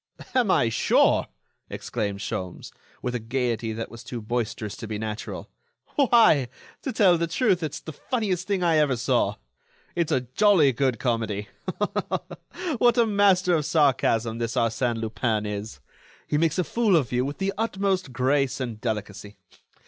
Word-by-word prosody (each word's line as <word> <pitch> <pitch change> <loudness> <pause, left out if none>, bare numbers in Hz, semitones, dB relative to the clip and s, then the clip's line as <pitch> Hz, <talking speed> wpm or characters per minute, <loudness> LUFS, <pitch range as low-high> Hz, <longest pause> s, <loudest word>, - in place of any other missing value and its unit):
"Am 250 -5 +2
I 120 - +3
sure?" 115 - +3 0.4
exclaimed 100 -4 -4
Sholmes, 90 -1 -5 0.3
with 125 - -2
a 125 - -1
gaiety 115 -1 -2
that 115 +1 -5
was 115 -1 -10
too 120 - -6
boisterous 110 -2 -3
to 115 - -7
be 105 -1 -3
natural, 110 0 -5 0.5
"why, 230 - +5 0.3
to 265 - -3
tell 190 -7 +4
the 170 - 0
truth, 190 0 +1
it's 155 -2 -3
the 160 - -9
funniest 190 - -2
thing 195 -3 0
I 165 -2 +3
ever 145 -4 +3
saw. 120 +1 +1 0.6
It's 170 -2 -1
a 130 -4 +2
jolly 155 - +4
good 130 0 0
comedy! 110 -4 -2 1.3
What 240 0 +4
a 235 - +5
master 200 -4 +3
of 155 -3 +2
sarcasm 120 -7 +2
this 115 +1 -2
Arsène 115 0 0
Lupin 110 -1 -1
is! 105 +1 -5 0.5
He 150 - 0
makes 165 0 +1
a 180 - +2
fool 220 +1 +2
of 140 -8 +1
you 125 0 +1
with 140 +2 -4
the 195 0 -1
utmost 195 - -1
grace 130 +1 +1
and 120 -4 -5
delicacy. 105 -2 -4
130 Hz, 160 wpm, -25 LUFS, 115-180 Hz, 1.3 s, why